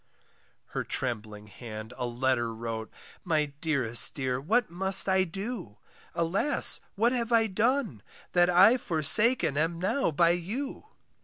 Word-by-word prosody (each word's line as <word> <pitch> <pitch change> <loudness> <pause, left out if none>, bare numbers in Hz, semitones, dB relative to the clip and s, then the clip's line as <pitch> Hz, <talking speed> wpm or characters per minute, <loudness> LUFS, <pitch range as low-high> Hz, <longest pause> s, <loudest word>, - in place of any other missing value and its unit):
Her - - -4
trembling 105 -4 -5
hand 110 +1 -10
a 125 - -4
letter 120 -1 -2
wrote, 110 -1 -6 0.3
My 155 -4 0 0.2
dearest 125 -8 +2
dear, 130 -2 -3
what 215 - 0
must 190 +3 +4
I 190 0 +2
do? 195 - -7 0.4
Alas! 180 - +3 0.2
what 230 +4 +1
have 240 -2 -3
I 230 -1 +3
done, 220 - -1 0.3
that 175 0 +3
I 195 +7 +5
Forsaken 165 - +2
am 165 +2 -1
now 190 +9 -1
by 170 +2 +2
you! 220 - -5
170 Hz, 135 wpm, -27 LUFS, -, 0.4 s, I